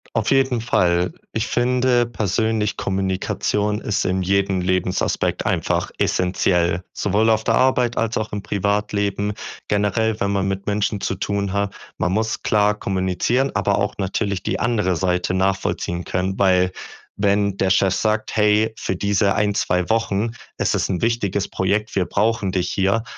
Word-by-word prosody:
Auf 110 -1 +1
jeden 130 -3 +2
Fall. 90 -6 +1 0.2
Ich 110 +1 -1
finde 125 0 +2
persönlich, 110 -1 -1
Kommunikation 95 +2 -1
ist 105 - -1
in 95 +1 0
jedem 95 0 +1
Lebensaspekt 90 0 0
einfach - - 0
essenziell, 90 -1 +1
sowohl 105 +3 +1
auf 110 0 +2
der - - +2
Arbeit 125 -2 +2
als 115 -1 0
auch 110 0 -3
im 105 -1 -4
Privatleben. 100 0 -1 0.4
Generell, 105 +2 0
wenn 100 - +1
man 100 -1 0
mit 95 0 -3
Menschen 105 0 0
zu - - -1
tun 100 0 -2
hat 100 0 -1 0.2
man 90 - 0
muss 110 +2 -1
klar 105 -1 +3
kommunizieren, 95 +8 0
aber 100 -1 +1
auch 100 -1 -1
natürlich 100 0 -2
die - - -2
andere 105 -7 +1
Seite 90 +1 0
nachvollziehen 95 -2 -1
können, 95 +1 -2
weil 90 -1 +3 0.4
wenn 100 -1 +1
der 95 - +1
Chef 95 0 +3
sagt: 110 +2 -1
„Hey, 105 +1 +3
für 95 - -3
diese 100 +1 +1
ein, 105 -1 +1
2 90 -2 0
Wochen 110 -1 0 0.3
ist - - +1
es - - 0
'n 90 -3 -1
wichtiges 100 -4 0
Projekt, 100 +3 -1
wir 95 - +3
brauchen 105 -1 0
dich 90 -1 -1
hier." 100 +3 +1
100 Hz, 160 wpm, -21 LUFS, 95-110 Hz, 0.4 s, klar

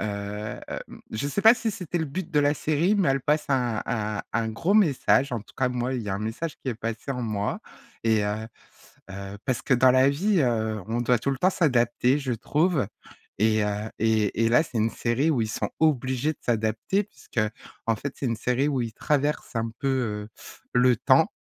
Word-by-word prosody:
hem, 105 0 -4 0.5
je 125 +6 -2
sais 200 - -1
pas 225 +2 +9
si 230 -2 -2
c'était 180 -4 -4
le 160 - 0
but 160 +4 -5
de 150 - +3
la 145 0 +3
série, 155 +7 +1
mais 195 -6 +2
elle 135 0 +1
passe 150 +3 +1
un 125 -5 +1
un 105 -2 -2
un 115 0 0
gros 115 - 0
message. 140 -8 +3
En 120 - -1
tout 105 - -17
cas, 130 -1 +2
moi, 125 +1 -2
il 125 - -2
y 105 - -6
a 95 - -1
un - - -3
message 115 +10 -4
qui - - -4
est 125 - -1
passé 115 +3 -5
en 125 -2 -2
moi 105 -3 -2 0.4
et 110 -2 +2
heu 105 +2 -2 0.6
heu 100 +1 -7
parce 130 -3 -1
que 140 - +1
dans 125 +1 +6
la 130 +2 +5
vie, 185 +7 +1
heu, 110 -4 0
on 115 +2 -1
doit 120 0 +2
tout 140 +4 -1
le 135 - -2
temps 180 +7 +3
s'adapter, 125 -5 +2
je 130 -3 -2
trouve 150 - +1 0.5
et 110 0 +3
heu 105 +1 -2
et 110 0 +2
et - - +3
là, 120 +4 +5
c'est 125 - -6
une 110 +1 +2
série 130 +7 +1
où 125 - +1
ils 110 - 0
sont - - -2
obligés 135 -1 +1
de - - -31
s'adapter, 115 - 0
puisqu'en 115 - -4
fait 140 +5 -5
c'est 135 - -2
une 115 - 0
série 125 +5 0
où 135 -4 0
ils 115 -1 -4
traversent 145 -1 -1
un 115 0 -1
peu, 140 - -2
heu, 110 -6 -1 0.4
le 125 0 +5
temps. - - +4
125 Hz, 215 wpm, -26 LUFS, 110-145 Hz, 0.6 s, pas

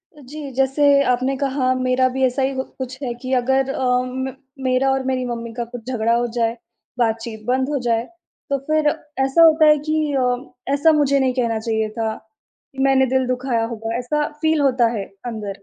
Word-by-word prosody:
अ, 295 - -15
जी, 290 +4 -9 0.2
जैसे 270 +2 +1 0.3
आपने 255 +2 -1
कहा 265 -2 0
मेरा 255 0 +3
भी 265 +1 -2
ऐसा 255 +2 0
ही 265 +1 +1
घ 260 - -1 0.2
कुछ 260 0 -5
है 245 -2 -2
कि 255 - -4
अगर 265 +2 +1
अम, 255 0 -1
म - - -9 0.3
मेरा 255 +1 +2
और 265 0 0
मेरी 255 -1 -1
मम्मी 230 -1 -5
का 240 +1 -3
कुछ 245 -1 -8
झगड़ा 230 -1 +1
हो 240 0 +1
जाए, 230 0 0 0.4
बातचीत 225 -1 -1
बंद 260 +2 +1
हो 290 -2 -1
जाए, 230 -1 +2 0.5
तो 280 - +1
फिर 310 -1 +2 0.4
ऐसा 270 +5 +3
होता 315 -1 +6
है 300 0 +6
कि 310 - +2 0.2
अ, 250 0 -2
ऐसा 285 +3 +4
मुझे 280 -1 +3
नहीं 260 -1 +1
कहना 230 -2 0
चाहिए 220 -1 -1
था। 220 -1 -1 0.8
मैंने 265 -1 +4
दिल 260 -1 +2
दुखाया 250 -2 -1
होगा, 225 0 -4
ऐसा 295 +4 -1
फ़ील 315 -1 +2
होता 260 -4 +3
है 195 - -3 0.2
अंदर। 210 -4 -6
255 Hz, 195 wpm, -21 LUFS, 235-270 Hz, 0.8 s, होता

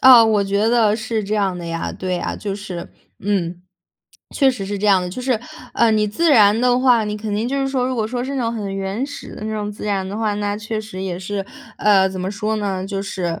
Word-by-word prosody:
啊， 250 -3 +9
我 215 -2 +3
觉 200 +3 +1
得 225 -3 +4
是 220 -1 -2
这 205 +2 -2
样 195 -3 +1
的 175 - -6
呀， 165 0 -3
对 185 -1 -3
呀。 - - -3
就 200 -2 -4
是， 190 -4 -6 0.3
嗯， 180 -3 -1 0.7
确 275 -2 +4
实 215 -7 -5
是 205 +1 -3
这 210 - 0
样 195 -2 +5
的。 180 - -3
就 250 +8 -6
是， 255 -3 +1 0.3
呃， 235 -1 +4
你 215 -1 +2
自 320 +10 +1
然 215 -4 +6
的 245 0 +3
话， 245 -4 +4
你 210 0 -3
肯 210 -1 -3
定 220 +3 0
就 275 - -1
是 270 - 0
说， 255 -2 0
如 260 - -1
果 220 -2 0
说 245 +1 -3
是 275 +2 -3
那 260 - -1
种 230 - 0
很 205 -4 -4
原 195 +7 -2
始 290 - -9
的 215 - -7
那 220 - -3
种 210 -1 -3
自 205 - -8
然 195 -2 0
的 200 - -5
话， 215 -2 0
那 205 0 -1
确 215 +1 -3
实 210 -3 -8
也 180 -2 -3
是， 195 +1 -3 0.3
呃， 195 -2 +5
怎 190 -1 -5
么 185 +2 -2
说 210 +2 -2
呢， 195 -3 -2
就 195 -1 -3
是， 175 -4 -3
210 Hz, 280 characters per minute, -20 LUFS, 195-225 Hz, 0.7 s, 啊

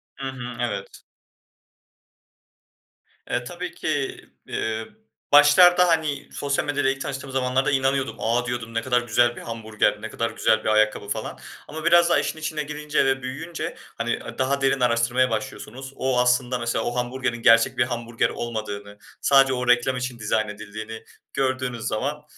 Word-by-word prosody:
Hı 135 - -5
hı, 125 -2 -7
evet. 105 -5 -4 2.3
Eee, - - -1
tabii - - -6
ki, - - -2 0.3
eee, 110 0 -3 0.4
başlarda, 175 +5 +7
hani 155 -4 0
sosyal 140 -1 -1
medyada 145 -2 +1
ilk 135 0 -2
tanıştığım 135 0 -5
zamanlarda 130 0 +1
inanıyordum. 135 0 +1
A, 120 +2 +1
diyordum, 120 -2 -4
ne 115 - 0
kadar 125 0 +1
güzel 120 +1 +2
bir - - -9
hamburger, 110 -2 -1
ne - - -5
kadar - - -2
güzel 110 - +1
bir - - 0
ayakkabı 110 -1 +2
falan - - -4 0.3
ama 160 +1 -7
biraz 170 0 +6
daha - - +4
işin 155 - -3
içine 155 -1 -3
girince 150 0 -1
ve 135 0 +1
büyüyünce 160 +6 -5 0.2
hani, - - -1
aaa, - - -9
daha 135 +1 0
derin 135 0 +2
araştırmaya 125 +1 +2
başlıyorsunuz. 120 +4 -5
O 130 -1 0
aslında, 125 0 +2
mesela, 115 -1 -1
o 120 - -2
hamburgerin 125 -1 -2
gerçek 115 +3 +5
bir 125 - +4
hamburger 120 -1 -1
olmadığını 105 -3 -5 0.2
sadece 135 -1 +5
o 125 -1 -2
reklam 125 +1 +3
için 125 -1 -4
dizayn 110 0 0
edildiğini 110 +2 -8 0.3
gördüğünüz 130 -3 -1
zaman 145 +7 -2
125 Hz, 160 wpm, -24 LUFS, 115-135 Hz, 2.3 s, başlarda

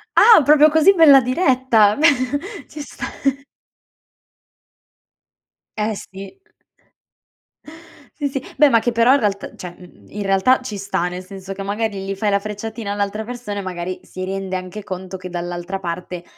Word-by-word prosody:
Ah, 445 -9 +8
proprio 300 +2 +6
così 320 +6 +5
bella 285 -5 +7
diretta? 255 - +2
Beh 315 +3 +4 0.6
ci 300 - -9
sta. - - -7 2.7
Eh, 215 +1 -1
sì. 195 - -11 1.8
Sì, 285 -1 -1
sì. 270 -1 -4 0.2
Beh 295 -2 +6
ma 230 -3 +4
che 240 - -1
però 230 +3 +4
in 285 - +3
realtà 200 -2 -2
cioè, 175 -1 -9
uhm, 180 -1 -17
in 205 -1 -6
realtà 195 +7 +3
ci 220 -5 -6
sta, 195 -3 -2
nel 180 +1 -6
senso 195 0 -9
che 195 - -8
magari 205 0 -3
gli 195 0 -4
fai 205 +1 -1
la 200 - +2
frecciatina 215 +1 -6
all'altra 205 +1 -2
persona 235 -4 -6
e - - -3
magari 180 -1 -5
si 185 0 -7
rende 190 0 -4
anche 185 +3 -6
conto 185 0 -7
che 185 0 -9
dall'altra 175 +2 -5
parte 175 0 -6
205 Hz, 160 wpm, -20 LUFS, 185-250 Hz, 2.7 s, Ah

